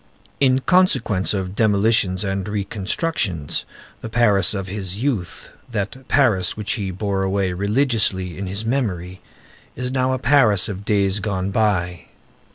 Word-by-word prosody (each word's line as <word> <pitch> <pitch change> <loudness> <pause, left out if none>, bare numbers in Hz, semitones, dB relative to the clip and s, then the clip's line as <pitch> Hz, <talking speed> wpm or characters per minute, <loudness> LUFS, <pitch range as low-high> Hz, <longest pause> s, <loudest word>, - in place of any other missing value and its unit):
In 130 -1 +3
consequence 155 - +2
of 95 -2 -2
demolitions 105 -3 +2
and 95 -1 -2
reconstructions, 100 - -2 0.3
the 115 - -7
Paris 105 -5 +3
of 95 -1 -3
his 95 -1 -5
youth, 115 -7 -3 0.2
that 115 +4 -4
Paris 110 -11 +2
which 105 -1 -3
he 100 -3 -3
bore 95 +1 -2
away 95 -1 0
religiously 100 - +1
in 95 +2 -5
his 100 +4 -4
memory, 95 -8 -2 0.5
is 125 0 -3
now 130 0 +1
a - - 0
Paris 120 -7 +3
of 100 -1 -6
days 100 -1 +2
gone 100 -2 -2
by. 90 -5 0
100 Hz, 140 wpm, -21 LUFS, 95-115 Hz, 0.5 s, In